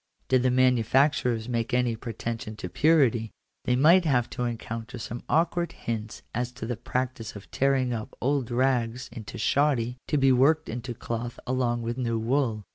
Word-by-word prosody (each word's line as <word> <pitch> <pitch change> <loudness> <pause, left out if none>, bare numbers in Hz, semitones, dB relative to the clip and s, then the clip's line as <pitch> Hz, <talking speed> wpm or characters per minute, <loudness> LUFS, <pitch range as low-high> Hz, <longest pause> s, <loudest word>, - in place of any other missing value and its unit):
Did 130 -1 +4
the 130 - +3
manufacturers 125 -1 +2
make 120 +1 -1
any 125 -2 +1
pretension 115 -1 -5
to 90 -4 -6
purity, 130 - +3 0.4
they 125 - +2
might 165 +8 +6
have 125 -7 +1
to 125 - -2
encounter 115 +1 -5
some 120 +1 -6
awkward 170 +2 +1
hints 110 -2 -5
as 125 +1 -2
to 125 -2 -6
the 120 +1 -2
practice 120 -1 -3
of 100 - -11
tearing 135 -2 +1
up 110 -2 -6
old 135 -2 0
rags 125 -1 0
into 110 -3 -8
shoddy 130 -4 +1
to 150 - +1
be 135 -1 +4
worked 140 +5 +3
into 120 +1 -5
cloth 120 +2 -5
along 120 -2 0
with 120 +2 -3
new 115 -2 0
wool. 115 -2 0
125 Hz, 170 wpm, -27 LUFS, 115-130 Hz, 0.4 s, might